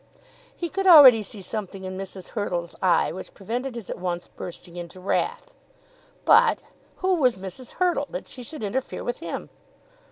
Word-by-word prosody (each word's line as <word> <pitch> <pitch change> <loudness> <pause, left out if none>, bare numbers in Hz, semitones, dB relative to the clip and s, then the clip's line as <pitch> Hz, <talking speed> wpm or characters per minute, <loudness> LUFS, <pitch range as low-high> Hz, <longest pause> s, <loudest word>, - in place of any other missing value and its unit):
He 345 - -3
could 385 +3 -2
already 275 -10 +10
see 205 -1 -10
something 195 -2 -5
in 185 0 -5
Mrs. 190 -1 -7
Hurtle's 175 -6 -3
eye 185 -2 +3
which 185 - -9
prevented 240 +6 -4
his 230 -5 -7
at - - -6
once 175 -1 -3
bursting 175 0 -9
into 175 +1 -8
wrath; 470 - -2 0.7
but - - +5 0.3
who 375 0 +1
was 255 - +3
Mrs. 190 +6 -9
Hurtle, 360 -1 +1
that - - -6
she 255 - -9
should 270 +1 -8
interfere 245 +6 -3
with 245 - -3
him? - - -6
215 Hz, 165 wpm, -25 LUFS, 185-275 Hz, 0.7 s, already